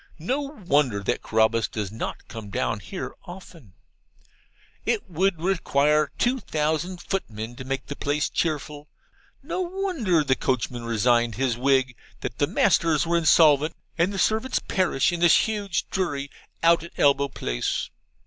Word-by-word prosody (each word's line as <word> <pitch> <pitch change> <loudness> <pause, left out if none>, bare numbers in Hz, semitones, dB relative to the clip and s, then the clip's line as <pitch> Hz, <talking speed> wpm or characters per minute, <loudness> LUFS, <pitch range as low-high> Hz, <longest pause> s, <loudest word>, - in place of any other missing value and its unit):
No 250 - -1
wonder 150 - 0
that - - -1
Carabas 110 -1 +2
does 105 -3 -4
not 110 - -6
come 110 -3 -8
down 100 - -1
here 185 - -6
often. 175 - -12 1.1
It - - -1
would 185 0 0
require 150 -4 +2
two 255 +2 +1
thousand 160 - -2
footmen 115 - -4
to - - -6
make 135 0 -3
the 145 - -6
place 145 +2 0
cheerful. 150 -2 -3 0.5
No - - -3
wonder 345 - 0
the 130 -2 +2
coachman 125 -2 -2
resigned 115 0 +2
his 125 0 0
wig, 130 0 +2 0.3
that - - -5
the - - +3
masters 160 -3 +2
are 170 +1 0
insolvent, 155 -2 +4 0.2
and 175 +3 +1
the 200 - -5
servants 220 +6 +1
perish 185 -6 +1
in 175 - -3
this 170 -1 +5
huge 205 -4 -2
dreary 145 -7 -2 0.3
out 170 0 +5
at 170 - -11
elbow 140 0 +4
place. - - -3
150 Hz, 150 wpm, -25 LUFS, 130-180 Hz, 1.1 s, this